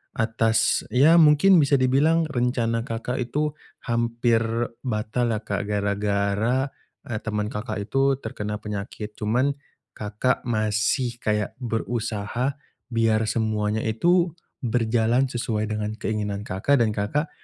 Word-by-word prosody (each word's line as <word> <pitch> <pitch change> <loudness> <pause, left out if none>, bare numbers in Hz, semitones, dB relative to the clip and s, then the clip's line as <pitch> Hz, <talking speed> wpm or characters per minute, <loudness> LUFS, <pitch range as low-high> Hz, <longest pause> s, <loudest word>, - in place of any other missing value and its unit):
atas 115 0 +2
ya 145 +7 +5
mungkin 160 +5 +6
bisa 140 0 +3
dibilang 145 +6 +3
rencana 120 -2 0
Kakak 120 +1 -3
itu 150 +5 -1 0.3
hampir 115 -1 +1 0.4
batal 120 0 -1
lah, 105 - -4
Kak, 100 -4 -2
gara-gara, 100 +5 0 0.3
eee, 115 -6 -3
temen 105 -1 -2
Kakak 110 +1 -4
itu 135 +5 +2
terkena 105 -4 -5
penyakit. 105 0 -6
Cuman 125 +7 +1 0.4
Kakak 105 +5 -1
masih 110 +2 0
kayak 105 -1 0
berusaha 115 +1 -2 0.3
biar 115 -2 +2
semuanya 110 -1 0
itu 170 +10 +2 0.3
berjalan 120 +2 +2
sesuai 110 -3 -2
dengan 105 0 -2
keinginan 105 -2 -3
Kakak 115 +8 +1
dan 115 - +3
Kakak 110 +9 -1
115 Hz, 115 wpm, -24 LUFS, 105-130 Hz, 0.4 s, mungkin